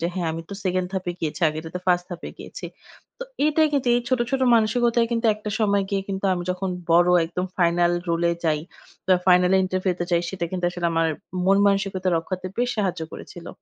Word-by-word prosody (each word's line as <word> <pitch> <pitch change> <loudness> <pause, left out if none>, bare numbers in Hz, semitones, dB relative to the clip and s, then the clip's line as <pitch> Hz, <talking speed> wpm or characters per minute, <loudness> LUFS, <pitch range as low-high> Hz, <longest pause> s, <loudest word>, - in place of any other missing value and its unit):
যে 170 - 0
হ্যাঁ 175 -3 -1
আমি 165 +1 -5
তো - - -5
সেকেন্ড 185 0 0
ধাপে 185 -2 -2
গিয়েছি। 160 +1 -3
আগেরটা 160 +1 -6
তো - - -5
ফার্স্ট 175 -1 +3
ধাপে 175 -2 -6
গিয়েছি। - - -9 0.5
তো - - -5 0.2
এইটাই 310 +1 +3
কিন্তু 275 -3 +1
এই 240 - +2
ছোট, 255 0 +2
ছোট, 270 -1 0
মানসিকতায় 235 +1 +2
কিন্তু 230 0 0
একটা 210 0 -6
সময় 200 -2 +2
গিয়ে 195 -1 0
কিন্তু 195 0 -4
আমি 175 - -3
যখন 185 +1 -2 0.2
বড় 175 +1 +5 0.2
একদম 180 +2 -3
ফাইনাল 175 0 +3 0.2
রোল 170 0 0
এ - - +1
যাই 155 -2 +1 0.5
বা 185 - +5
ফাইনাল 180 0 +5
ইন্টারভিউতে 185 -1 -1
যাই 170 -1 +2
সেটা 190 -3 -3
কিন্তু 180 -1 -3
আসলে 175 -1 -2
আমার 165 0 +2 0.4
মন 195 +1 +5
মানসিকতা 195 -2 0
রক্ষাতে 185 +3 -4
বেশ 245 0 +1
সাহায্য 195 -6 -1
করেছিল। 175 -1 -10
185 Hz, 205 wpm, -23 LUFS, 175-200 Hz, 0.5 s, বড়